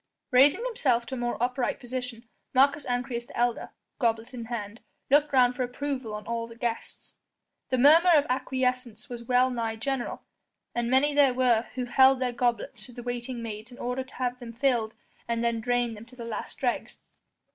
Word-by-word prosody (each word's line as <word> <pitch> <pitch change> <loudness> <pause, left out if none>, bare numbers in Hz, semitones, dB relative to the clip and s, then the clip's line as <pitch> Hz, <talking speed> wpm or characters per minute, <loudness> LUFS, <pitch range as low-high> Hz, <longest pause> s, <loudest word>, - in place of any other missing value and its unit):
Raising 280 - +5
himself 255 - +1
to 265 - -8
a - - -2
more 240 0 -1
upright 250 +1 -1
position, 250 -2 -6 0.3
Marcus 280 +2 +4
Ancyrus 245 -1 -2
the - - -10
elder, 240 0 0 0.3
goblet 230 0 0
in 235 -2 -6
hand, 225 -1 -5 0.3
looked 290 +1 +4
round 250 -2 +4
for 255 - -3
approval 255 -2 -3
on 210 - -7
all 230 0 -3
the 230 - -12
guests. 235 -1 -5 0.6
The 255 - +1
murmur 315 +7 +7
of 290 -1 +4
acquiescence 250 -1 -2
was 235 -1 -7
well 250 +1 +3
nigh 230 -2 -2
general, 250 +2 -3 0.5
and 240 0 -1
many 275 +3 +3
there 280 -3 +4
were 245 -3 +3
who 255 -1 -2
held 265 +1 +5
their 250 -1 -1
goblets 240 -1 -1
to 250 - -13
the 240 0 -8
waiting 245 0 -4
maids 220 +1 -7
in 245 - -12
order 250 +2 -2
to 260 - -17
have 250 -1 -2
them 235 -2 -8
filled 235 -3 0 0.3
and 235 0 -1
then 235 -1 0
drained 245 -1 0
them 215 +2 -11
to 250 +1 -17
the 235 -2 -7
last 230 -2 -6
dregs. 245 -3 -2
245 Hz, 190 wpm, -27 LUFS, 235-260 Hz, 0.6 s, murmur